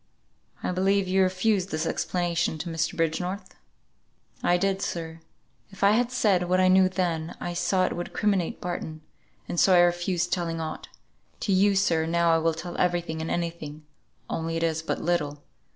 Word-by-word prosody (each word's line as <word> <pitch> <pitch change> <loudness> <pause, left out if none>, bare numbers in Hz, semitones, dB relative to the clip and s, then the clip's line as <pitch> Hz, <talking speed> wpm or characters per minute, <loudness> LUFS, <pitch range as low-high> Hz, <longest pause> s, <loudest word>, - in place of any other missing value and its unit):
I - - 0
believe 190 +1 +2
you 190 +1 +2
refused 185 +1 +1
this 155 -1 -2
explanation 170 -2 -1
to 170 +3 -5
Mr. 165 0 -2
Bridgenorth." 180 +4 -2 0.9
"I 175 - +3
did, 195 +1 0
sir! 165 -3 -4 0.5
If 195 0 -8
I 200 - +6
had 240 +3 +2
said 195 -8 +2
what 185 0 +3
I 185 0 +5
knew 185 0 +5
then, 170 -3 -2
I 175 - -4
saw 185 +1 +1
it - - -1
would 175 - -5
criminate 200 -5 0
Barton, 165 -3 -5 0.5
and 175 - -2
so 190 - +5
I - - +7
refused 175 0 +1
telling 165 -2 -2
aught. 160 -1 -5 0.5
To 200 - +1
you, 200 +2 +4
sir, 165 -5 +2
now 170 0 +2
I 165 - +3
will 165 0 +1
tell 175 +2 -6
every 175 -1 +2
thing 160 -1 -5
and 160 - -4
any 170 -1 -1
thing; 155 -2 -10 0.4
only 165 0 -2
it 165 - -1
is 160 -1 0
but 160 - -2
little. 150 -4 -1
175 Hz, 185 wpm, -26 LUFS, 165-185 Hz, 0.9 s, I